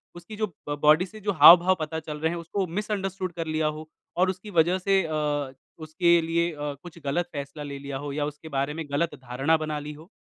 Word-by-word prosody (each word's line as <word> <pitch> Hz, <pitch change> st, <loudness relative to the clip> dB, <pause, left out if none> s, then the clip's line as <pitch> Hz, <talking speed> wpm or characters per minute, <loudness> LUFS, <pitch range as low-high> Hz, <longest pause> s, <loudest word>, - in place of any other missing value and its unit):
उसकी 175 Hz, +5 st, -10 dB
जो 215 Hz, 0 st, 0 dB, 0.2 s
ब 145 Hz, -, -1 dB
बॉडी 155 Hz, +4 st, +5 dB
से 215 Hz, +3 st, -12 dB
जो 205 Hz, 0 st, -1 dB
हाव-भाव 175 Hz, +3 st, +8 dB
पता 160 Hz, +1 st, -3 dB
चल 155 Hz, -1 st, -7 dB
रहे 160 Hz, +1 st, +1 dB
हैं 170 Hz, -, -3 dB
उसको 180 Hz, +4 st, -2 dB
मिसअंडरस्टूड 195 Hz, 0 st, -3 dB
कर 165 Hz, -1 st, -4 dB
लिया 155 Hz, 0 st, 0 dB
हो 155 Hz, +1 st, -5 dB, 0.3 s
और 185 Hz, +1 st, +3 dB
उसकी 185 Hz, +3 st, -5 dB
वजह 175 Hz, +3 st, +3 dB
से 195 Hz, +1 st, +2 dB
अ, 150 Hz, -4 st, -2 dB, 0.2 s
उसके 170 Hz, +2 st, +2 dB
लिए 170 Hz, +1 st, 0 dB
अ, 145 Hz, -2 st, -4 dB
कुछ 175 Hz, -1 st, -11 dB
गलत 170 Hz, +5 st, -1 dB
फैसला 140 Hz, +1 st, -6 dB
ले 140 Hz, -1 st, -6 dB
लिया 140 Hz, -1 st, -5 dB
हो 145 Hz, -, -4 dB
या 145 Hz, 0 st, -1 dB
उसके 150 Hz, +2 st, -8 dB
बारे 140 Hz, +2 st, 0 dB
में 165 Hz, +1 st, -5 dB
गलत 150 Hz, +2 st, 0 dB
धारणा 135 Hz, +4 st, 0 dB
बना 155 Hz, -1 st, -3 dB
ली 150 Hz, +1 st, -7 dB
हो? 155 Hz, +3 st, -14 dB
160 Hz, 230 wpm, -26 LUFS, 150-175 Hz, 0.3 s, हाव-भाव